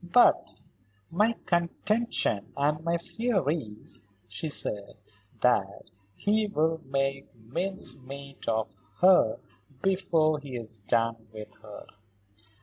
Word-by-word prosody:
"But 180 +8 +4 0.6
my 210 +7 +3
contention 170 - 0
and 150 +2 +1
my 170 0 +1
fear 215 - -1
is," 110 -10 -6 0.3
she 160 - -3
said, 105 -8 -1 0.4
"that 100 -5 +1 0.2
he 215 +1 +1
will 160 -4 0
make 135 0 -1
mincemeat 140 - -4
of 110 -2 -1 0.3
her 180 -12 +6 0.5
before 165 -5 +2
he 140 -3 -8
is 115 -2 -5
done 115 +2 0
with 105 -1 -9
her." 105 -1 -10
140 Hz, 105 wpm, -28 LUFS, 115-175 Hz, 0.6 s, her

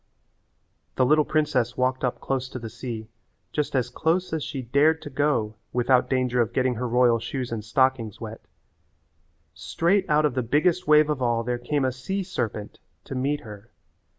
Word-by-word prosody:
The 130 - +3
little 150 +3 +4
princess 135 -6 0
walked 130 +1 0
up 125 - -1
close 130 -1 -2
to - - -6
the 115 -3 -7
sea, 115 -2 -6 0.4
just 150 -2 -2
as 125 -1 0
close 165 +6 0
as 160 -3 -1
she 140 -4 -5
dared 145 +6 +3
to 145 - -8
go 130 -6 0 0.2
without 125 +1 +3
danger 125 -2 +1
of 115 0 -1
getting 130 0 +1
her 125 +2 -3
royal 120 -1 +3
shoes 125 +1 -4
and 110 -2 -3
stockings 115 -2 +1
wet. 110 -1 -7 1.1
Straight 175 - 0
out 150 0 +4
of 145 - +1
the 130 - 0
biggest 155 +9 +1
wave 150 0 +5
of 140 -3 -3
all 120 -2 +1
there 120 +1 -2
came 140 +2 0
a 130 - +1
sea 190 +11 -3
serpent 115 - -4 0.2
to - - -8
meet 140 +3 -1
her. 105 -1 -11
130 Hz, 180 wpm, -25 LUFS, 120-150 Hz, 1.1 s, wave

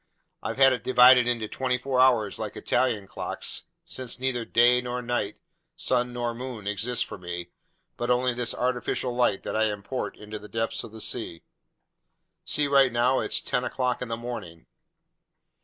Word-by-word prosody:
I've - - -4
had 135 -1 +6
it 125 - -4
divided 125 -1 +7
into 115 -3 0
twenty 125 +3 -1
four 130 0 -1
hours 120 -6 +3
like - - -5
Italian 120 -6 0
clocks, - - -3 0.2
since 125 -1 -3
neither 125 -3 -1
day 120 +2 +4
nor 125 0 -3
night, 120 -4 -2 0.4
sun 125 0 0
nor 120 -1 -2
moon, 120 -3 -7
exist 105 +4 -1
for - - -9
me, 90 -1 -6 0.5
but 120 - -3
only 125 0 +2
this 120 0 -2
artificial 125 0 -1
light 120 -5 +2
that - - -4
I 110 0 +3
import 105 +4 -4
into 105 0 -8
the 105 - -12
depths 115 0 -2
of - - -10
the 110 0 -9
seas! 110 -6 -3 1.0
See, 145 -1 +1
right 135 -2 +5
now 120 +3 +2
it's - - 0
ten 125 - -1
o'clock 125 -1 -1
in 125 - -3
the 115 0 -3
morning." 105 -9 -7
120 Hz, 175 wpm, -26 LUFS, 110-125 Hz, 1.0 s, divided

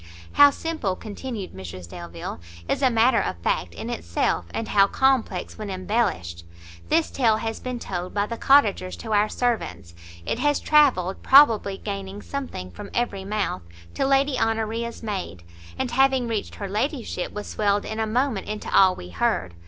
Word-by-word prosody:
"How 285 0 +8
simple," 285 - -3
continued 215 0 -6
Mrs 90 -1 -8
Delvile, 85 0 -7 0.3
"is - - -1
a 265 - +5
matter 230 -1 +4
of 95 - -3
fact 85 0 -1
in - - -6
itself, 85 +1 -1
and 225 - -4
how 200 -1 +5
complex 265 -1 0
when 210 -1 -5
embellished! 185 - -1 0.5
This 320 +1 +2
tale 225 -5 +3
has 225 0 -4
been 250 -1 -4
told 180 -5 -5
by 205 0 0
the 230 - -5
cottagers 220 -9 +3
to 220 -2 -4
our 210 +1 +3
servants; 220 - -2 0.3
it - - -2
has 290 -1 +2
travelled, 255 - +3
probably 230 -8 +5
gaining 200 0 -6
something 260 - -5
from 85 - -9
every 200 -5 -1
mouth, 205 - -2 0.3
to - - -1
Lady 275 -1 +2
Honoria's 225 +1 -1
maid, 190 - -4 0.3
and, 260 -2 -2
having 265 0 +3
reached 225 -3 -3
her 200 - -5
ladyship, 220 - -2
was 210 - -6
swelled 205 -1 0
in 220 - -4
a 220 - 0
moment 240 -2 0
into 215 0 -3
all 190 -1 +6
we 90 - -9
heard! 90 +1 -1
215 Hz, 170 wpm, -24 LUFS, 185-250 Hz, 0.5 s, How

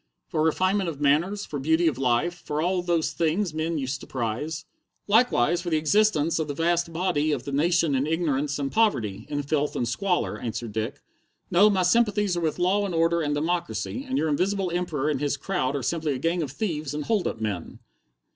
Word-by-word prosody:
For 155 - 0
refinement 185 +4 +2
of 150 -4 -7
manners, 165 +8 +2
for 145 - -5
beauty 160 +5 +2
of 135 -5 0
life, 135 +6 +1
for 155 -4 -5
all 180 +3 +1
those 170 -3 0
things 165 +3 0
men 160 +1 -1
used 135 -1 -3
to - - -10
prize." 135 +6 -3 0.4
"Likewise 190 - +3
for 175 - -4
the 160 - +2
existence 165 -1 +2
of 160 - -1
the 145 - -4
vast 170 +1 +1
body 165 -3 0
of 140 -5 -1
the 140 - -5
nation 165 +2 +2
in 135 +2 +1
ignorance 150 -3 0
and 140 -1 -2
poverty, 130 - +1
in 145 -1 -2
filth 145 +1 -1
and 120 - -1
squalor," 180 +10 -1
answered 115 -1 -4
Dick. 110 +6 -4 0.5
"No, 195 +4 +6
my 190 -3 +2
sympathies 210 -1 +2
are 175 - -1
with 160 -2 -1
law 190 +3 +2
and 190 -4 -2
order 165 +1 +2
and 145 -1 0
democracy, 175 - -2
and 265 - 0
your 160 - +1
Invisible 185 +4 0
Emperor 165 -5 -1
and 145 -3 0
his 145 -1 0
crowd 145 -4 -1
are 140 - -2
simply 155 +1 -1
a - - -3
gang 165 +6 0
of 150 - -3
thieves 150 -5 -3
and 150 -1 -3
hold 215 -5 +1
up - - -4
men." 105 -6 -4
160 Hz, 210 wpm, -25 LUFS, 145-180 Hz, 0.5 s, No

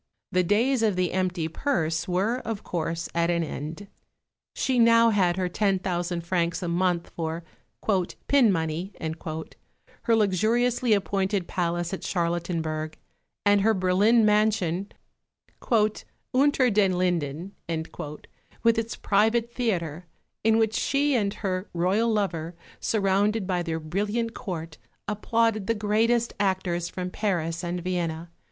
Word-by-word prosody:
The 185 - +3
days 225 +8 +2
of 215 -4 +2
the 180 -1 0
empty 180 -3 0
purse 165 - -1
were, 195 +7 +1
of 225 -4 -5
course, 165 -1 -3
at 170 0 +1
an 170 -1 +1
end. 160 +5 -6 0.7
She 260 -1 0
had 235 - +6
now 230 0 +6
her 185 -3 +2
ten 195 +1 +1
thousand 175 -2 -2
francs 170 0 0
a - - -2
month 175 0 0
for 165 0 -4 0.8
"pin 265 -7 +5
money," 165 +2 -2
her 160 +7 -4
luxuriously 225 +4 +2
appointed 195 -2 0
palace 175 0 -1
at 190 - -5
Charlottenburg, 165 -3 -2 0.5
and 205 0 +5
her 220 +2 +3
Berlin 200 +5 +4
mansion, 210 -3 +2 1.4
"Unter 265 -2 +4
den 195 -3 +3
Linden," 175 -1 -1 1.1
with 230 -1 +4
its 225 0 -3
private 225 +3 +1
theatre, 175 - -2 0.4
in 225 0 +4
which 220 -1 +2
she 285 +4 +1
and 205 -5 +1
her 190 -2 -3
Royal 195 +7 +2
lover, 175 -6 -1 0.2
surrounded 205 0 +1
by 180 -2 0
their 165 -2 -2
brilliant 205 +8 -2
Court, 165 -8 -6 0.3
applauded 215 0 0
the 230 - +2
greatest 225 +3 +1
actors 185 -3 0
from 180 -1 -5
Paris 170 -5 -1
and 175 +1 -3
Vienna. 170 -2 -2
190 Hz, 130 wpm, -26 LUFS, 170-220 Hz, 1.4 s, had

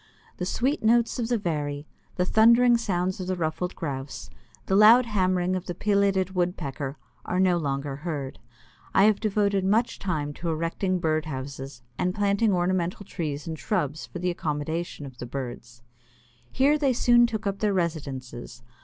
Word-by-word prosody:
The 180 - -3
sweet 265 +9 0
notes 235 +2 +3
of 230 - -1
the 240 0 +1
Veery, 150 -6 -3 0.3
the 180 - +1
thundering 235 +4 +5
sounds 185 -5 -1
of 185 - -4
the 185 - 0
Ruffed 175 +2 -2
Grouse, 135 - -5 0.3
the 190 - +1
loud 225 +5 +7
hammering 185 -4 +1
of 185 0 -5
the 175 - -4
Pileated 200 -2 +1
Woodpecker, 150 -6 -2 0.3
are 180 - -2
no 185 -2 +4
longer 140 -3 -2
heard. 145 -4 -5 0.6
I 195 - +6
have 210 -1 +4
devoted 200 -2 +1
much 220 +5 +1
time 150 -6 -2
to 170 - -1
erecting 165 +4 -1
bird 155 -2 0
houses 135 -3 -7 0.2
and 180 +1 0
planting 205 +1 +2
ornamental 180 +1 0
trees 150 -6 -4
and 160 -2 -5
shrubs 150 +2 -2
for - - -8
the 180 +1 -1
accommodation 155 0 -3
of 130 -3 -11
the 120 - -6
birds. 120 -2 -7 0.7
Here 285 +3 +3
they 275 -3 +2
soon 240 0 +5
took 220 -2 -4
up 200 0 -2
their 210 -1 +1
residences. 140 -10 -4
180 Hz, 165 wpm, -26 LUFS, 145-200 Hz, 0.7 s, loud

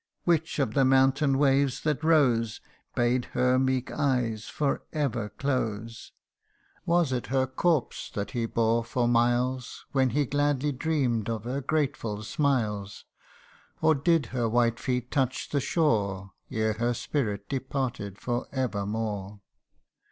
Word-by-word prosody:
Which 165 -2 +1
of 135 -7 0
the 135 - +3
mountain 135 +1 +4
waves 135 -1 +2
that 150 0 -1
rose, 125 -9 +3 0.4
Bade 120 +1 +2
her 125 0 +3
meek 130 -1 0
eyes 125 -7 0
for 145 +1 -1
ever 140 -9 -1
close? 115 -4 -3 0.8
Was 170 -4 +3
it 125 -2 -2
her 130 0 +2
corpse 140 +2 0
that 100 0 -3
he 120 -3 -1
bore 115 0 +1
for 120 +1 0
miles, 120 +2 +1
When 135 -2 +2
he 145 +3 +1
gladly 145 +1 +1
dreamt 130 -6 0
of 110 -2 -3
her 130 +4 -3
grateful 130 -8 -1
smiles? 110 -7 -1 0.7
Or 160 0 +4
did 160 +2 +2
her 120 -3 0
white 120 0 +2
feet 125 -1 -2
touch 130 -3 0
the 140 - 0
shore, 100 - 0 0.2
Ere 110 0 0
her 120 +3 0
spirit 105 -8 -2
departed 130 -7 -3
for 120 +2 -3
evermore 105 -4 -3
125 Hz, 135 wpm, -27 LUFS, 115-140 Hz, 0.8 s, mountain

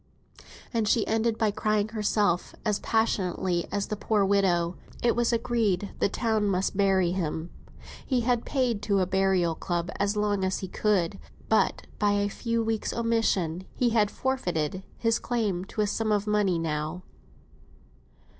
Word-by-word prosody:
And 225 -2 +1
she 220 +1 +3
ended 225 0 +1
by 220 -2 +2
crying 215 0 0
herself, 210 -4 0
as 210 -2 +1
passionately 185 -5 0
as 200 -1 -1
the 210 - -3
poor 210 -1 +1
widow. 185 -3 +2 0.3
It 240 - +3
was 240 0 +2
agreed 230 -5 +1
that 205 - -9
the - - +2
town 220 -1 0
must 190 0 0
bury 190 -3 +3
him; 165 -2 -3 0.5
he 255 -3 0
had 240 0 +1
paid 250 -6 0
to 205 -1 +1
a 185 - +2
burial 190 -2 +2
club 175 +2 -3
as 200 +1 +1
long 205 -2 +1
as 190 0 0
he 190 - -5
could; 190 -4 0 0.3
but - - +2
by 205 -1 +3
a 205 0 +1
few 230 +2 -1
weeks' 225 -1 -1
omission, 200 -7 0
he 245 - +2
had 215 -3 +3
forfeited 185 - -2 0.2
his 230 0 +1
claim 210 -7 -1
to 215 - -3
a - - +3
sum 215 +1 -1
of 205 -1 +1
money 210 -4 +2
now. 160 +2 -3
205 Hz, 165 wpm, -27 LUFS, 185-225 Hz, 0.5 s, she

